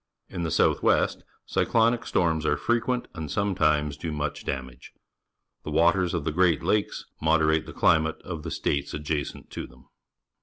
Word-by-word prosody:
In 90 - -5
the 85 - -1
south - - +2
west - - +2 0.2
cyclonic 115 +1 +1
storms 80 -2 +1
are 75 - +2
frequ 120 +1 0
ent 125 -1 -2
and 80 -4 -6
sometimes 75 -6 +1
do 80 +1 -4
much 75 0 -4
dafnageT 65 -2 -5 0.7
The - - -6
waters 85 +3 +2
of 85 - -2
the 80 - -1
Great 85 -1 +2
Lakes 105 -1 0 0.2
moderate 80 0 +2
the - - -7
climate 80 -1 +2
of 85 -4 -6
the - - -6
states 70 0 -2
adjacent 75 0 -4
to - - -6
them. - - -20
80 Hz, 165 wpm, -26 LUFS, 75-90 Hz, 0.7 s, south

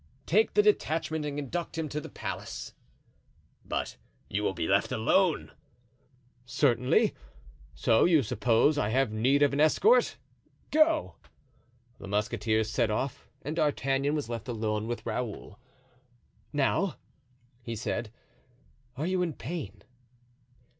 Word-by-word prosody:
"Take 215 +6 +2
the 210 - +6
detachment 160 -6 +1
and 145 0 -4
conduct 165 +4 -4
him 160 -1 -1
to 150 +2 -3
his - - -9
place." - - -6 0.9
"But - - -3 0.3
you 100 - 0
will 100 -2 -1
be 80 -1 -2
left 100 +1 +2
alone?" 110 +1 +2 0.9
"Certainly. 125 0 +2 0.6
So 115 - +3
you 160 -5 +4
suppose 120 +6 +2
I 105 - 0
have 130 0 +1
need 130 +7 +3
of 140 - +3
an 140 - -1
escort? 445 - +4 0.5
Go." 310 0 +3 0.8
The - - -9
musketeers 110 +1 0
set 115 +1 +1
off 120 +5 -3 0.2
and 150 +3 -4
D'Artagnan 140 -1 +1
was 150 -5 -2
left 120 +1 -5
alone 110 -2 -2
with 120 0 -4
Raoul. 110 -3 -4 0.9
"Now," 150 +6 +1 0.7
he 115 -1 -5
said, 110 +1 -3 0.9
"are 150 - -2
you 185 0 0
in 170 -3 -1
pain?" 120 - -6
135 Hz, 125 wpm, -29 LUFS, 110-155 Hz, 0.9 s, the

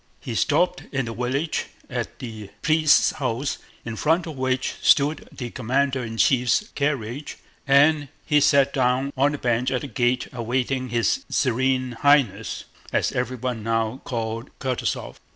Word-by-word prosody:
He 120 - -6
stopped 175 +9 +2
in 135 -3 -1
the 115 - -5
village 130 +7 -1 0.2
at - - -4
the 110 -4 -8
priest's 155 -1 +4
house 130 0 -2 0.3
in 115 -1 -4
front 165 +7 +1
of 160 -3 -6
which 130 0 -1
stood 145 +1 +3
the 120 -3 -6
commander 135 +2 0
in 115 -1 -6
chief's 130 - +3
carriage, 140 -1 -2 0.3
and 145 +2 +5 0.2
he 150 -1 +3
sat 140 0 +4
down 130 +1 +1
on 140 +2 +2
the - - -2
bench 120 -1 0
at 125 - -1
the 145 - -5
gate 125 -1 0
awaiting 125 +2 -1
his 120 - +1
Serene 130 0 +1
Highness, 145 -7 +2 0.3
as - - +1
everyone 125 -2 -2
now 115 +3 -1
called 115 0 -4
Kutúzov. 130 -2 -3
130 Hz, 150 wpm, -24 LUFS, 120-140 Hz, 0.3 s, and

